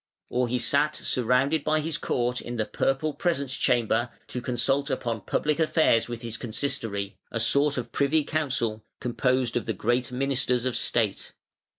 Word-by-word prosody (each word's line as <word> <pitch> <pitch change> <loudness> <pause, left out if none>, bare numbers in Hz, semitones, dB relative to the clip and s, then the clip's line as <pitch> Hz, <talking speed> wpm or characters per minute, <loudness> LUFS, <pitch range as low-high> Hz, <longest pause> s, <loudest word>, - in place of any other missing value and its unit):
Or 125 0 +1
he 125 +1 0
sat 140 +5 +2
surrounded 130 +5 +1
by 155 0 +2
his 155 0 -2
court 125 0 -1
in 120 - -6
the 110 -2 0
purple 135 +7 0
presence 140 -7 -1
chamber 120 0 +2 0.2
to 125 - -3
consult 135 +4 0
upon 115 -5 -2
public 150 +8 0
affairs 155 -8 +3
with 120 -1 -6
his 115 -1 -4
Consistory, 110 -5 -3
a 115 - -1
sort 140 +5 +3
of 125 - -4
Privy 145 +2 +2
Council, 130 -9 -1 0.2
composed 125 +1 0
of 120 - -1
the 110 - 0
great 120 +5 0
ministers 130 -1 0
of 130 - 0
state. 110 -5 0
125 Hz, 165 wpm, -27 LUFS, 120-140 Hz, 0.2 s, affairs